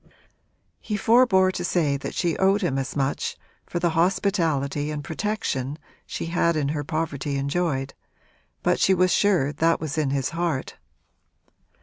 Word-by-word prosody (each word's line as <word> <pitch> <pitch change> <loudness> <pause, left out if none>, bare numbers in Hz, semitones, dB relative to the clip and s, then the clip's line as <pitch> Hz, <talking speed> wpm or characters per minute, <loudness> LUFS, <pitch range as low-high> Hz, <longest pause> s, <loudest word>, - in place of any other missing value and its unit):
He 210 - -3
forbore 205 -4 +4
to 180 - -4
say 160 -5 +1
that 140 - -5
she 170 -3 0
owed 195 +2 +3
him 135 -6 0
as 130 -1 -4
much 140 -1 -1 0.3
for - - -4
the 175 -1 +1
hospitality 165 -5 +1
and 150 -1 -4
protection 155 -7 -2 0.3
she - - -4
had 170 0 +1
in 145 -2 0
her 145 0 -2
poverty 145 -2 -2
enjoyed, 140 -1 -1 0.7
but - - +2
she 190 - +4
was 185 0 +3
sure 175 -9 +2
that 165 +3 +2
was 155 -1 -3
in 150 -3 +1
his 135 -1 0
heart. 165 -5 -2
160 Hz, 150 wpm, -24 LUFS, 140-180 Hz, 0.7 s, forbore